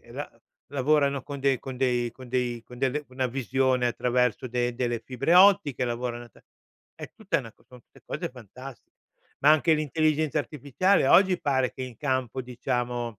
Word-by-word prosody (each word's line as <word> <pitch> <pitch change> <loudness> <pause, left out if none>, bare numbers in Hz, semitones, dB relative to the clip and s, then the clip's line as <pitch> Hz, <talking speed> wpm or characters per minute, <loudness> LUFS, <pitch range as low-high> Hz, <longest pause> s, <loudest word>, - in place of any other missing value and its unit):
e - - -17
la - - -6 0.4
lavorano 140 0 +2
con 140 0 -7
dei 135 -2 +1
con 130 -1 -8
dei 125 -2 0
con 130 -1 -13
dei 120 -2 -1
con 125 0 -13
delle 145 +3 -1
una 130 0 -2
visione 130 0 0
attraverso 125 0 0
de 120 0 -1
delle 120 -2 -2
fibre 135 +7 0
ottiche, 180 -9 +5
lavoran 120 0 -3
a 120 - -13
ta - - -22 0.5
è - - -9
tutta 195 -7 -1
una 115 -4 -11
son 125 +1 -16
tutte - - -22
cose - - -4
fantastiche. 125 +2 -12 0.5
Ma 145 - +6
anche 155 +1 +4
l'intelligenza 155 0 0
artificiale 145 +4 +1
oggi 190 -2 +5
pare 130 -3 0
che 130 - -7
in 125 -3 -8
campo, 130 -1 -2
diciamo, 120 -2 -3
130 Hz, 175 wpm, -26 LUFS, 125-145 Hz, 0.5 s, Ma